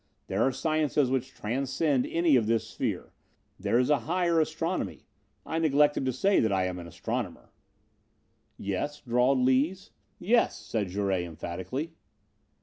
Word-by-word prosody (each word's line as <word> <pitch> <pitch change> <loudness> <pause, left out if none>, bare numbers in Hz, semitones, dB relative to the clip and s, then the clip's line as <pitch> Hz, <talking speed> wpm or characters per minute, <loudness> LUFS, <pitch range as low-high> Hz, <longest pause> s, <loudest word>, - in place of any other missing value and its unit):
There - - -1
are 135 - +3
sciences 150 -1 +1
which 130 0 -1
transcend 135 +4 0
any 165 -4 +3
of 115 -4 +3
this 115 -1 +1
sphere. - - -4 0.5
There 115 - +1
is 125 +4 +2
a 150 - +4
higher 175 -2 +2
astronomy. 165 +3 -2 0.4
I 160 - -2
neglected 145 -3 +3
to 130 - +1
say 195 +11 +2
that 110 - +2
I 95 -1 +2
am 90 -1 -3
an 85 - -8
astronomer." 85 - -5 1.1
"Yes?" 100 +10 -3
drawled 125 +2 +2
Lees. 140 - +1 0.3
"Yes!" 225 +6 +2
said 105 -4 -3
Jouret 95 -1 0
emphatically. 95 - -5
135 Hz, 145 wpm, -28 LUFS, 110-155 Hz, 1.1 s, a